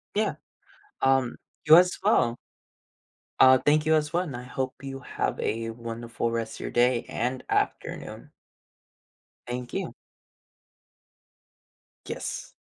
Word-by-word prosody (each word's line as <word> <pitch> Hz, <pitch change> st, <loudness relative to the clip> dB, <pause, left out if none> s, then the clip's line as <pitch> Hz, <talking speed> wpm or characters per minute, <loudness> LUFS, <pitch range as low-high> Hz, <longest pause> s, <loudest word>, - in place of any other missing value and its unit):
Yeah, 215 Hz, +1 st, +1 dB, 0.7 s
um, 135 Hz, -2 st, +2 dB, 0.3 s
you 155 Hz, +1 st, +9 dB
as 180 Hz, +1 st, +4 dB
well. 120 Hz, 0 st, +3 dB, 1.0 s
Uh, 130 Hz, 0 st, +8 dB
thank 150 Hz, +3 st, +2 dB
you 160 Hz, 0 st, +4 dB
as 150 Hz, 0 st, 0 dB
well, 175 Hz, -4 st, -1 dB
I 125 Hz, -, -6 dB
hope 130 Hz, +1 st, -4 dB
you 135 Hz, 0 st, -6 dB
have 130 Hz, -, -3 dB
a 115 Hz, 0 st, -2 dB
wonderful 115 Hz, 0 st, -4 dB
rest 115 Hz, -1 st, -3 dB
of -, -, -11 dB
your -, -, -4 dB
day 120 Hz, 0 st, +2 dB
and 125 Hz, +2 st, -2 dB
afternoon. -, -, -2 dB, 1.2 s
Thank 125 Hz, 0 st, -5 dB
you. -, -, -3 dB, 2.1 s
Yes. -, -, -5 dB
125 Hz, 120 wpm, -27 LUFS, 120-145 Hz, 2.1 s, you